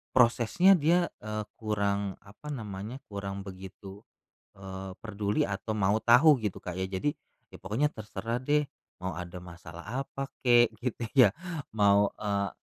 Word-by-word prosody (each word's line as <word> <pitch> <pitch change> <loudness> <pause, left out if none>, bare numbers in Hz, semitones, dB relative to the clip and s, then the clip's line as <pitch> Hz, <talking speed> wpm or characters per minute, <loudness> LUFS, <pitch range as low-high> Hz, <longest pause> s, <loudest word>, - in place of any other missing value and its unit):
prosesnya 125 - +5
dia, 170 +4 +3
eee, 110 0 -4 0.2
kurang 100 -2 -1
apa 105 +9 -14
namanya, 110 -1 -6
kurang 100 -1 -4
begitu, 95 +1 -10 0.6
eee, 95 -1 -7
perduli 105 -1 0
atau 100 +2 -3
mau 100 +1 +2
tahu 130 +5 +6
gitu 105 -4 -3
Kak, 90 0 -5
ya 95 - -1
jadi 95 +10 -1 0.4
ya - - -10
pokoknya 130 +10 0
terserah 115 +2 -4
deh, 150 +3 +2 0.4
mau 95 - -1
ada 90 0 -7
masalah 85 -1 -10 0.2
apa 135 0 -6
kek 120 -2 +5
gitu 120 -1 -3 0.2
ya, 100 - -4 0.4
mau, 100 -1 +4
eee 100 -2 -1
105 Hz, 140 wpm, -29 LUFS, 95-120 Hz, 0.6 s, tahu